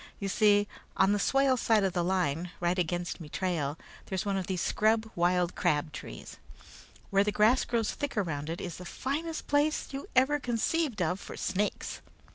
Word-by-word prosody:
You 195 - -2
see, 205 0 +4 0.3
on 195 +1 +4
the 205 - +1
swale 270 +4 +3
side 225 -3 +3
of 190 -2 +1
the 175 -2 +1
line, 175 -2 0
right 175 +1 +1
against 175 +1 -2
me 155 - -8
trail, 160 -5 -1 0.3
there's 190 0 -2
one 200 -1 0
of 190 -2 -2
these 185 -2 -1
scrub 220 +1 +2
wild 175 0 +2
crabtrees. 150 - -2 0.7
Where 195 0 +4
the 210 - 0
grass 220 +5 +4
grows 230 -3 0
thick 285 -5 -4
around 160 -6 -1
it, 165 - -3
is 175 -3 -5
the 180 - -8
finest 305 - -3
place 290 +2 +1
you 275 0 -6
ever 270 +3 +4
conceived 245 - 0
of 180 +3 0
for - - -9
snakes. 200 +2 -2
195 Hz, 180 wpm, -30 LUFS, 175-235 Hz, 0.7 s, see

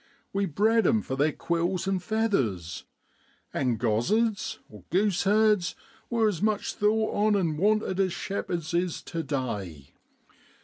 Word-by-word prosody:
We 200 0 +1
bred 220 +8 +3
'em 220 -2 +2
for 130 - -3
their 145 +3 +2
quills 170 +4 -1
an' 195 -1 +1
feathers, 135 - -1 0.7
and 125 -4 0
gozzards 200 - +1 0.3
(goose 195 +1 +1
herds) 210 -2 +3 0.3
were 230 -2 +2
as 190 -6 -1
much 215 -1 0
thought 215 +1 +1
on 210 0 +3
an' 170 -6 +1
wanted 200 +2 +1
as 190 -2 +2
shepherds 175 -3 -3
is 175 -1 -1
tu 165 - -4
day. 105 - -4
185 Hz, 135 wpm, -27 LUFS, 150-215 Hz, 0.7 s, bred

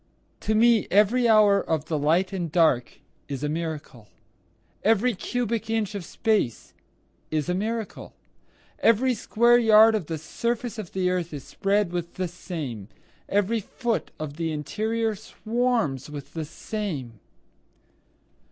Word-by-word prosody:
To 215 - 0
me 230 -1 +4
every 215 +5 +4
hour 210 -2 +6
of 160 -2 -1
the 155 -2 -1
light 170 +7 +2
and 175 -5 -3
dark 155 -8 +2 0.3
is 140 0 -5
a 150 - 0
miracle, 150 -8 -5 0.7
Every 225 +3 +3
cubic 230 +2 -2
inch 220 -2 0
of 200 -3 -4
space 205 - -1 0.6
is 155 +1 -1
a - - +2
miracle, 220 +3 -4 0.6
Every 245 +3 +4
square 240 +2 +3
yard 220 -1 +7
of 205 -8 -2
the 160 - -3
surface 235 +8 -3
of 195 -6 -7
the 185 -1 +1
earth 180 -2 -2
is 140 - -7
spread 200 -2 0
with 175 -1 -4
the 185 -1 -2
same, 150 - -6 0.4
Every 205 +3 +1
foot 230 +2 -3
of 150 -1 -6
the 165 -1 -1
interior 220 +9 -1
swarms 220 - -1
with 145 -2 -9
the 160 -2 -4
same. 150 - -5
195 Hz, 140 wpm, -25 LUFS, 160-225 Hz, 0.7 s, yard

